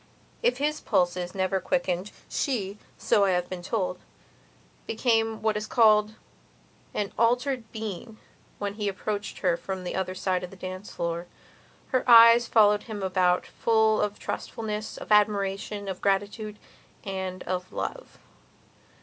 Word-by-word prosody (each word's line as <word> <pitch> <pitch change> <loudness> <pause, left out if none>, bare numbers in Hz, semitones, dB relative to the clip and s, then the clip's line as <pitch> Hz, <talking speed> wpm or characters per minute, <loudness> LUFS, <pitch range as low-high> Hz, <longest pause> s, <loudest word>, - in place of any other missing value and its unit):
If 485 +1 +2
his 300 +2 -1
pulses 180 0 0
never 190 0 0
quickened 190 -4 -1 0.2
she, 210 -7 -2 0.2
so 200 - +3
I 190 - +2
have 180 0 -1
been 180 -1 -5
told, 185 -1 -2 0.9
became 225 -1 +1
what 220 -1 +2
is 210 +1 -3
called 215 -2 +4 0.8
an 205 -1 -2
altered 245 0 +1
being 220 0 -6 0.4
when 200 -1 -3
he 210 -1 -3
approached 205 +1 -4
her 175 -2 +4
from 190 +1 -5
the 180 - -4
other 185 -1 -2
side 185 -1 -1
of 180 - -7
a - - -11
dancing 185 +1 -7
floor. 170 0 -3 0.6
Her 255 -2 +1
eyes 230 0 +9
followed 210 -2 +5
him 205 -3 -5
about 185 -1 +2
full 220 -1 +2
of 205 0 -1
trustfulness, 215 -1 -5
of - - -9
admiration, 205 -1 +1
of 190 -2 -5
gratitude, 205 +2 -1 0.5
and 190 -2 -4
of 180 0 -4
love. - - -5
205 Hz, 140 wpm, -27 LUFS, 185-220 Hz, 0.9 s, eyes